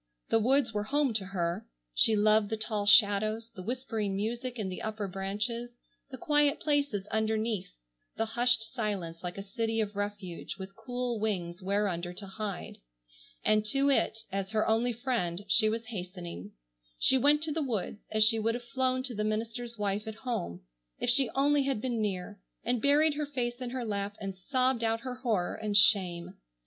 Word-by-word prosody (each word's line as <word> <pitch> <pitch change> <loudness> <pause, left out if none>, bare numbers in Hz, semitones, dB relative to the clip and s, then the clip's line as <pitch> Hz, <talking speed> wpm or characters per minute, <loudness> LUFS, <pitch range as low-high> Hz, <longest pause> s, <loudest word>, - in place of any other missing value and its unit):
The 225 - +4
woods 250 +1 +2
were 210 0 -1
home 285 0 +1
to 205 -3 -1
her. 175 -3 -2 0.3
She 220 - +5
loved 215 0 +4
the 220 - -1
tall 215 -2 -2
shadows, 215 +2 +5
the 220 - -9
whispering 220 -2 -2
music 235 +5 -3
in 210 -4 -2
the 185 - -5
upper 215 -2 -3
branches, 210 +6 -3 0.3
the 260 - -7
quiet 295 +2 +2
places 285 -10 0
underneath, 220 - -1 0.4
the 225 - +1
hushed 240 +1 +2
silence 205 -8 -3
like 180 +1 -5
a 195 - -5
city 225 +3 -2
of 210 -2 -1
refuge 205 -4 -4
with 195 0 -8
cool 245 -1 -3
wings 180 -5 -2
whereunder 185 -3 -1
to 200 +3 -5
hide. 195 -1 -5 0.7
And 215 0 +4
to 275 +6 +2
it, 260 - +2
as 195 0 -2
her 215 - +2
only 230 +2 +2
friend, 220 -7 -2
she 215 +2 +4
was 225 +1 -3
hastening. 180 - -7 0.4
She 265 - +5
went 295 +3 +4
to 320 - +1
the 315 +2 -1
woods 220 -6 -3
as 215 0 +5
she 225 +1 +5
would 225 +1 +1
have 240 - -5
flown 255 +2 0
to 260 -2 -3
the 210 -1 -2
minister's 230 +2 -3
wife 205 +1 -1
at 220 - -5
home, 85 - -3 0.4
if 245 - +2
she 270 0 +3
only 285 +1 +3
had 270 -5 0
been 235 -1 -1
near, 200 0 -3 0.2
and 245 -1 0
buried 295 +2 +4
her 295 0 -3
face 245 -3 -3
in 250 - -3
her 250 -1 -3
lap 205 -1 -3
and 195 -2 -5
sobbed 255 +4 0
out 225 0 +1
her 255 -1 -5
horror 220 -9 0
and 210 -2 0
shame. 185 -3 +4
220 Hz, 185 wpm, -30 LUFS, 200-245 Hz, 0.7 s, She